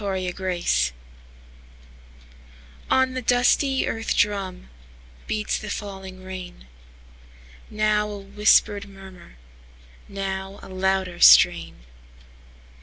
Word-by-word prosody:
Rain 190 -2 -3
Music 175 - -1 1.9
ON 260 0 +2
the 255 - -4
dusty 250 +3 +2
earth 225 0 -2
drumBeats 65 - -4
the 215 - -8
falling 190 -2 -7
rain; 185 - -9 1.0
Now 210 0 0
a 205 - -6
whispered 205 0 +2
murmur, 190 - -14 0.7
Now 195 0 -5
a - - -11
louder 190 -1 -1
strain. - - +5
195 Hz, 85 wpm, -23 LUFS, 185-210 Hz, 1.9 s, strain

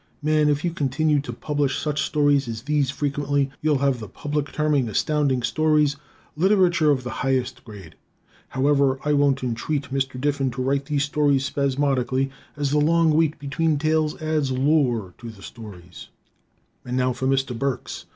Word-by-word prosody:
Man, 155 0 +3
if 145 +3 0
you 175 - 0
continue 150 0 +1
to 140 -3 -5
publish 145 +3 -1
such 150 -1 -1
stories 145 -3 +2
as 115 0 -5
these 145 -2 +1
frequently, 140 -1 -1
you'll 150 -2 +2
have 135 -3 +1
the 110 - -7
public 145 +7 -4
terming 150 -5 +1
Astounding 140 +2 0
Stories 150 -1 +2 0.4
literature 175 -2 +3
of 135 -3 +2
the 125 - -5
highest 130 -1 -1
grade! 100 -8 -12 0.5
However, 140 0 +2
I 150 - +2
won't 140 -2 +2
entreat 130 +3 -2
Mr. 135 -1 -2
Diffin 140 -1 0
to 130 +1 -3
write 140 +1 0
these 145 -1 0
stories 140 -2 +1
spasmodically, 135 -1 0 0.3
as 145 -2 -1
the 150 - +3
long 165 +2 +3
wait 160 -1 +2
between 150 +2 0
tales 155 0 0
adds 155 -3 -1
lure 130 - +1
to 120 - -8
the 100 -3 -13
stories. 95 -7 -11 0.8
And 125 +1 -3
now 130 0 +1
for 130 - -3
Mr. 135 -2 0
Burks. 135 +1 -3
140 Hz, 165 wpm, -23 LUFS, 130-150 Hz, 0.8 s, Man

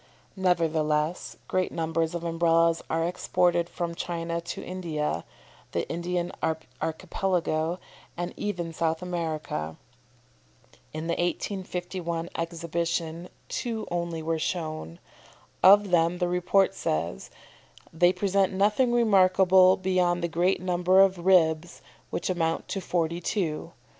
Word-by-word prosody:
Nevertheless 160 -3 0
great 185 -1 0
numbers 165 0 -1
of 170 - -4
Umbrellas 165 0 +2
are 165 +1 +1
exported 175 -1 +1
from 170 -1 -3
China 170 0 -3
to 170 0 -6
India, 165 -5 -3 0.5
the - - -1
Indian 175 +1 -2 0.5
Archipelago, 165 0 -1 0.4
and 175 +1 -3
even 175 -5 -3
South 160 +1 -1
America. 155 - -3 1.1
In 155 +1 -5
the 170 - 0
1851 175 -2 -3
Exhibition 170 0 -3 0.2
two 230 -3 -3
only 170 -2 -2
were 160 0 -1
shown. 155 - -3 0.6
Of 200 0 +7
them 170 0 +3
the 180 0 0
report 180 +2 +2
says, 80 - -3 0.6
"They 175 +2 +4
present 195 0 +1
nothing 210 +6 +2
remarkable 190 -4 +5
beyond 180 -2 +1
the - - +2
great 175 +3 +1
number 180 +1 +2
of 190 -2 +2
ribs, 170 -2 +3 0.3
which - - -3
amount 165 -3 -1
to 195 - -2
forty 170 -2 -1
two. 165 -4 -2
175 Hz, 115 wpm, -27 LUFS, 165-185 Hz, 1.1 s, Of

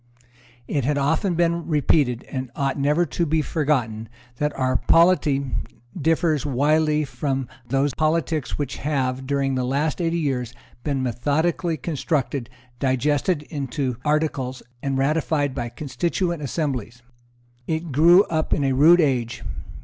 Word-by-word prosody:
It 140 - -1
has 145 +3 +1
often 160 +6 +1
been 170 0 +1
repeated, 145 -5 +2
and 130 -2 -5
ought 140 0 -1
never 150 +5 +2
to 170 - -2
be 160 -1 +1
forgotten, 125 -9 -1 0.3
that 150 +2 0
our 130 -1 +1
polity 145 - +3 0.4
differs 160 -2 +1
widely 150 +2 +2
from 135 0 -2 0.2
those 135 +2 +1
politics 155 -1 0
which 140 -3 -3
have, 130 -3 -1
during 140 -1 0
the 130 -1 0
last 145 +6 -1
eighty 170 0 0
years, 125 -6 -2 0.3
been 140 -3 -1
methodically 155 - 0
constructed, 140 -4 -2 0.3
digested 145 +4 +1
into 140 -4 -3
articles, 145 -4 -1 0.2
and 135 -1 -1
ratified 145 0 +1
by 120 -3 -3
constituent 155 +7 -2
assemblies. 130 -5 -3 0.6
It 160 0 -2
grew 170 +7 +6
up 160 -4 -1
in 145 - -1
a 135 -1 +2
rude 165 +6 +6
age. 125 -5 0
145 Hz, 135 wpm, -23 LUFS, 130-160 Hz, 0.6 s, grew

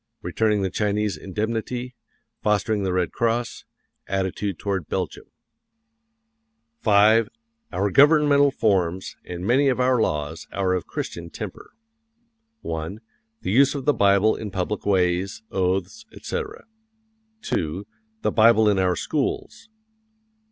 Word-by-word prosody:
Returning 105 -3 +1
the 95 - -1
Chinese 105 -2 0
Indemnity; 115 +7 -3 0.5
fostering 105 0 +1
the 95 -1 -1
Red 90 -1 0
Cross; 115 +1 -1 0.4
attitude 95 0 -2
toward 95 -5 -3
Belgium. - - -3 1.6
V. 110 +2 +5 0.5
OUR 100 0 0
GOVERNMENTAL 145 - +5
FORMS 95 -7 0
AND 90 +1 -6
MANY 130 +6 +3
OF 130 -2 +1
OUR 125 -2 +3
LAWS 75 -2 -2
ARE 95 -2 0
OF 90 - 0
A - - -45
CHRISTIAN 85 0 -5
TEMPER. - - -8 0.9
1. 80 +5 -5 0.4
The - - -1
use 135 +6 +4
of 140 - -4
the 145 - +4
Bible 100 0 +4
in 105 - -6
public 95 +2 -3
ways, 95 +2 +1
oaths, 95 - -1
etc. 450 - -5 0.8
2. 85 +5 -2 0.4
The - - +2
Bible 110 -1 +5
in 100 -2 +3
our 90 -1 +2
schools. 155 - -3
105 Hz, 125 wpm, -23 LUFS, 95-115 Hz, 1.6 s, V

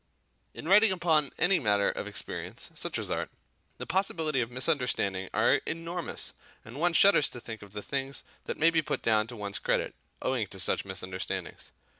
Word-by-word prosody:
In - - -7
writing 205 +3 +6
upon 160 -5 +2
any 190 +1 +4
matter 105 -6 +2
of - - -5
experience, - - -6
such - - -3
as - - -3
art, - - -2 0.5
the - - -6
possibilities 160 -7 0
of 115 - -2
misunderstanding 125 - 0
are 120 +5 +3
enormous, 165 +1 -4 0.3
and 120 +6 -9
one 175 +1 +3
shudders 195 -5 +6
to 120 - -8
think 110 -2 -8
of 100 -1 -13
the 105 -1 -5
things 135 0 -3 0.2
that - - -4
may 165 +2 +5
be 160 -1 +3
put 150 - -3
down 110 -1 +3
to 120 - -7
one's 100 -2 -4
credit, - - 0 0.3
owing 125 -5 -1
to 95 - -7
such 90 - +3
misunderstandings. 95 -1 -5
130 Hz, 180 wpm, -29 LUFS, 105-165 Hz, 0.5 s, writing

